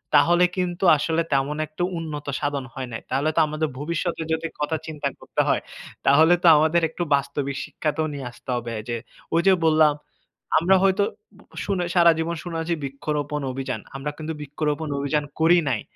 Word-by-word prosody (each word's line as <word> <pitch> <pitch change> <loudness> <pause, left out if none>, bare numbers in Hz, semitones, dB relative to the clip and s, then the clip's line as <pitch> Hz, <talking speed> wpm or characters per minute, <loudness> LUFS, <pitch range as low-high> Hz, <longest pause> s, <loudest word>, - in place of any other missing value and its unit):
তাহলে 175 +5 +5
কিন্তু 180 0 -1
আসলে 160 +3 0
তেমন 140 +2 +1
একটা 155 +3 -4
উন্নত 150 -3 -5
সাধন 140 -2 -2
হয় 130 -2 -5
নাই। 115 - -5
তাহলে 145 +3 +1
তো - - +3
আমাদের 155 +1 -2
ভবিষ্যতে 170 +2 -2
যদি 160 +1 -2
কথা 150 +2 0
চিন্তা 150 -2 -3
করতে - - -1
হয়, - - +2 0.4
তাহলে 155 +5 +6
তো - - +5
আমাদের 160 +3 +3
একটু 175 +2 -3
বাস্তবিক 140 0 -2
শিক্ষাতেও 155 0 -2
নিয়ে 140 -3 -5
আসতে 130 - -16
হবে 120 -1 -5 0.2
যে, 120 - -1 0.4
ঐ - - +2
যে 190 - +7
বললাম, 155 -1 +5 0.7
আমরা 185 +4 +4
হয়তো 195 +1 +3 0.6
শুনে 190 -3 0
সারা 170 -1 +7
জীবন 165 +1 -1
শোনাচ্ছি 170 -1 -2
বৃক্ষরোপণ 145 +2 -3
অভিযান। 135 +1 -4
আমরা 140 +2 -3
কিন্তু 160 0 -4
বৃক্ষরোপণ 150 +2 -2
অভিযান 145 +1 0 0.2
করি 170 +2 +6
নাই, 115 -5 0
155 Hz, 170 wpm, -24 LUFS, 140-165 Hz, 0.7 s, যে